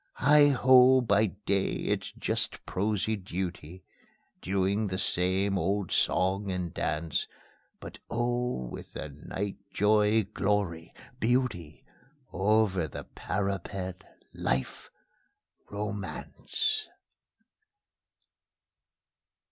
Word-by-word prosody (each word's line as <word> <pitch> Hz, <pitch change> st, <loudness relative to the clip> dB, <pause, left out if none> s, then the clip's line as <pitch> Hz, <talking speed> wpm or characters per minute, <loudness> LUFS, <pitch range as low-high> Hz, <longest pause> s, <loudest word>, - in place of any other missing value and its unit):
Heigh 145 Hz, +2 st, +6 dB
ho! 130 Hz, -1 st, +6 dB
by 110 Hz, -2 st, +3 dB
day 100 Hz, 0 st, -1 dB
it's -, -, -2 dB
just -, -, -2 dB
prosy 105 Hz, +2 st, 0 dB
duty, 90 Hz, -2 st, -5 dB, 0.6 s
Doing 100 Hz, +3 st, 0 dB
the 95 Hz, -1 st, -3 dB
same 95 Hz, +2 st, +1 dB
old 95 Hz, +2 st, -1 dB
song 95 Hz, +2 st, +1 dB
and 90 Hz, -3 st, -3 dB
dance; 80 Hz, 0 st, -1 dB, 0.5 s
But -, -, -10 dB
oh! 120 Hz, -, -1 dB
with -, -, -9 dB
the 75 Hz, -, -5 dB
night 95 Hz, +8 st, -5 dB
joy, 105 Hz, +1 st, +3 dB
glory, 95 Hz, -5 st, -1 dB, 0.3 s
beauty: 115 Hz, -, -1 dB, 0.5 s
Over 95 Hz, -3 st, +2 dB
the -, -, -7 dB
parapet 95 Hz, -1 st, -4 dB, 0.3 s
Life, 65 Hz, 0 st, -2 dB, 0.8 s
Romance! 105 Hz, -, -3 dB
100 Hz, 85 wpm, -29 LUFS, 90-110 Hz, 0.8 s, Heigh